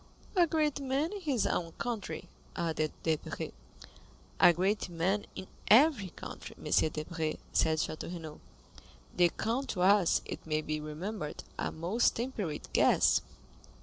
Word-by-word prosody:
"A 350 Hz, -2 st, +5 dB
great 305 Hz, -3 st, +1 dB
man 275 Hz, +4 st, 0 dB
in 405 Hz, -, -6 dB
his 280 Hz, -, +1 dB
own 165 Hz, -2 st, -1 dB
country," 235 Hz, -4 st, -4 dB, 0.3 s
added 155 Hz, -2 st, -1 dB
Debray. 160 Hz, -2 st, -2 dB, 0.9 s
"A -, -, +8 dB
great 190 Hz, +4 st, 0 dB
man 180 Hz, +5 st, 0 dB
in 190 Hz, -, -6 dB, 0.2 s
every 240 Hz, -, +6 dB
country, -, -, -9 dB
M. -, -, -7 dB, 0.2 s
Debray," 155 Hz, +1 st, -3 dB, 0.2 s
said 160 Hz, 0 st, +3 dB
Château 155 Hz, +1 st, -3 dB
Renaud. 160 Hz, -4 st, -7 dB, 0.8 s
The 175 Hz, -1 st, +5 dB
count 235 Hz, +9 st, -2 dB
was, 190 Hz, 0 st, +4 dB
it -, -, -6 dB
may 155 Hz, -1 st, -1 dB
be 155 Hz, 0 st, -2 dB
remembered, 155 Hz, +3 st, -5 dB, 0.2 s
a -, -, -1 dB
most 180 Hz, +9 st, +1 dB
temperate 220 Hz, -, -3 dB
guest. -, -, +4 dB
185 Hz, 135 wpm, -31 LUFS, 160-240 Hz, 0.9 s, A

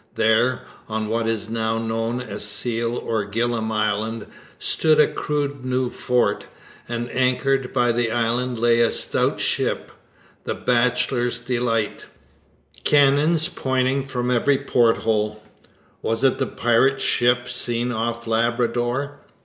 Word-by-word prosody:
There, 110 Hz, +3 st, +2 dB, 0.3 s
on 110 Hz, -1 st, -2 dB
what 115 Hz, 0 st, 0 dB
is 115 Hz, -1 st, -2 dB
now 110 Hz, 0 st, -1 dB
known 115 Hz, +2 st, -2 dB
as 125 Hz, -, -5 dB
Seal 115 Hz, +2 st, -1 dB
or 110 Hz, -2 st, -2 dB
Gillam 115 Hz, +1 st, -1 dB
Island, 110 Hz, +1 st, -1 dB, 0.3 s
stood 155 Hz, -1 st, +2 dB
a 150 Hz, -, +7 dB
crude 145 Hz, -2 st, -3 dB
new 130 Hz, -1 st, -1 dB
fort; 120 Hz, -5 st, 0 dB, 0.4 s
and 120 Hz, 0 st, -3 dB
anchored 130 Hz, +1 st, +1 dB
by 120 Hz, -2 st, +2 dB
the 120 Hz, 0 st, 0 dB
island 120 Hz, +2 st, 0 dB
lay 120 Hz, 0 st, +3 dB
a 115 Hz, -, +3 dB
stout -, -, -1 dB
ship -, -, -1 dB, 0.5 s
the -, -, -3 dB
Bachelor's 125 Hz, 0 st, +1 dB
Delight 120 Hz, -3 st, -2 dB, 0.8 s
cannons 150 Hz, +3 st, +4 dB
pointing 130 Hz, -5 st, 0 dB
from 125 Hz, -2 st, -2 dB
every 135 Hz, +3 st, +3 dB
porthole. 110 Hz, -4 st, +1 dB, 0.6 s
Was 115 Hz, +3 st, -1 dB
it 135 Hz, -, +3 dB
the -, -, 0 dB
pirate 120 Hz, +4 st, +2 dB
ship 120 Hz, -1 st, +2 dB
seen 120 Hz, +1 st, -1 dB
off 115 Hz, 0 st, -3 dB
Labrador? 120 Hz, +4 st, -1 dB
120 Hz, 125 wpm, -22 LUFS, 115-125 Hz, 0.8 s, a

